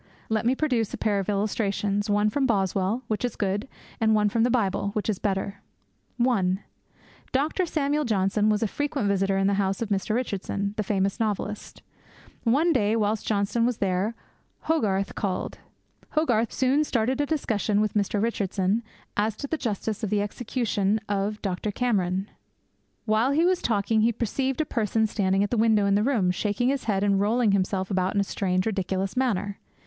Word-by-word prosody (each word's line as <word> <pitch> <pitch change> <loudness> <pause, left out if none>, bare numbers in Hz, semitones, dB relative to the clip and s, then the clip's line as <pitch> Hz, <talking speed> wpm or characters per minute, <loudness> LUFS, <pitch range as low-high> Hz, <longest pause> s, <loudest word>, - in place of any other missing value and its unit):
Let 220 +1 +1
me 255 - +3
produce 250 -8 0
a - - -8
pair 205 -2 +1
of 195 - -3
illustrations, 205 0 0
one 205 +1 +2
from 270 +3 +1
Boswell, 195 +2 0
which 215 0 -2
is 245 - -1
good; 205 +3 -1 0.3
and 220 -1 +3
one 210 -1 +3
from 225 +2 0
the 240 - +3
Bible, 200 -5 +1
which 215 - -2
is 210 -4 -1
better. 200 0 -2 0.6
(1) 200 -7 +2 0.7
Dr. 310 +7 +1
Samuel 300 -1 0
Johnson 210 -2 +1
was 210 +1 +2
a - - +2
frequent 285 -1 -2
visitor 195 0 +1
at 195 - +2
the 200 - +3
house 195 0 -1
of 230 - -3
Mr. 200 +1 0
Richardson, 200 -4 -2
the 215 - -1
famous 195 -1 0
novelist. 210 -1 -3 0.6
One 300 +9 +3
day, 215 -4 +2
whilst 215 -1 0
Johnson 210 +2 +1
was 240 -1 +1
there, 195 +3 0 0.5
Hogarth 205 -11 0
called. 190 -3 -3 0.5
Hogarth 240 -8 +2
soon 265 +3 +2
started 255 0 0
a 290 - 0
discussion 220 -9 0
with 215 0 +1
Mr. 205 0 0
Richardson 200 -1 0 0.3
as 210 +1 0
to 280 - -5
the 300 - -1
justice 220 -5 -3
of 215 - 0
the 205 0 +1
execution 215 -2 -1
of 205 +1 -1
Dr. 195 +1 -2
Cameron. 195 -4 0 0.8
'While 225 +5 +2
he 320 +4 +3
was 365 0 +2
talking, 220 0 +1
he 230 +2 +4
perceived 260 +5 -1
a - - -1
person 220 -3 0
standing 195 -2 +1
at 205 - -2
a - - +2
window 220 -2 +4
in 200 - +3
the 205 - +3
room, 215 -7 +2
shaking 210 +6 0
his 275 -3 -1
head, 200 -3 +1
and 200 -1 +3
rolling 220 +2 +2
himself 190 0 0
about 185 0 0
in - - +3
a - - +3
strange, 185 -2 -1
ridiculous 195 -2 -1
manner. 205 -6 0
210 Hz, 185 wpm, -26 LUFS, 200-235 Hz, 0.8 s, he